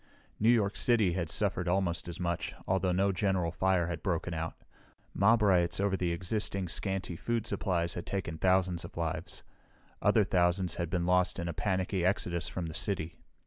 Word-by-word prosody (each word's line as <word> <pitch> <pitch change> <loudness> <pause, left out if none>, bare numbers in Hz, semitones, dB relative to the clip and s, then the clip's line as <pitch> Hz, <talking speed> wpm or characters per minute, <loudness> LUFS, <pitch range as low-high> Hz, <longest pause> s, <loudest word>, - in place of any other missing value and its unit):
New 110 - +4
York 110 -4 +3
City 110 -7 +3
had 85 -3 -2
suffered 90 0 +1
almost 85 -2 0
as 85 - -6
much, 85 -1 -2
although 95 -1 +1
no 95 +2 +2
general 95 -2 0
fire 95 0 +1
had 85 -2 -4
broken 85 -1 -1
out. 80 0 -3 0.6
Mob 110 +3 +4
riots 90 -4 +3
over 100 -1 +1
the 90 -2 -1
existing, 95 +2 -2
scanty 95 0 -3
food 115 +5 -2
supplies 85 -6 -1
had 90 - -6
taken 85 -5 -3
thousands 95 -2 +2
of - - -10
lives. 85 -1 -4 0.6
Other 110 - +4
thousands 90 -1 +1
had 85 -2 -3
been 85 0 -1
lost 90 0 +2
in 85 -1 -3
a 85 - -3
panicky 95 +1 -1
exodus 85 -3 0
from 90 - -4
the 80 - -6
city. 85 -2 -1
90 Hz, 180 wpm, -31 LUFS, 85-95 Hz, 0.6 s, New